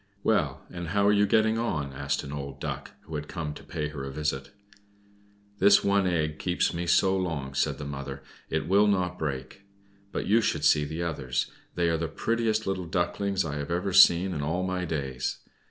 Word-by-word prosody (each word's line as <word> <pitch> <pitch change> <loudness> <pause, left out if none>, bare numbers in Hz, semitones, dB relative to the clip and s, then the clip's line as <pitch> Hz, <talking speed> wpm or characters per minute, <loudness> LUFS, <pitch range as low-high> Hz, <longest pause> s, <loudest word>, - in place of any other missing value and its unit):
"Well, - - +1
and 85 -1 -5
how 100 +4 +1
are 100 - +6
you 105 0 +4
getting 110 +2 +3
on?" 75 -12 -2
asked 70 +1 -2
an 70 - -7
old 70 -1 -6
Duck, - - -4
who 80 - -12
had 75 -1 -4
come 80 -5 -4
to - - -11
pay 75 -1 -3
her 75 -3 -6
a 70 - -4
visit. 70 -2 -2 1.1
"This 100 0 +6
one 100 -1 +3
egg 75 -3 0
keeps 90 -1 0
me 85 +1 -3
so 95 +3 +4
long," 80 -8 -2
said - - 0
the 75 - -6
mother. 70 -1 -6 0.3
"It - - -1
will 100 +3 +5
not 90 -3 0
break. 70 +3 -4 0.5
But - - -3
you 110 +3 +4
should 80 -8 0
see 75 -1 +5
the 80 +3 -4
others! 70 -7 -2 0.2
They 85 -1 +1
are 85 0 +2
the 80 +1 -2
prettiest 110 +5 0
little 95 -2 -2
Ducklings 95 +2 0
I 75 -2 -3
have 85 +6 -2
seen 90 0 +7
in 75 - -3
all 80 +5 -1
my 90 -1 -1
days. 70 -5 -3
85 Hz, 200 wpm, -27 LUFS, 75-95 Hz, 1.1 s, seen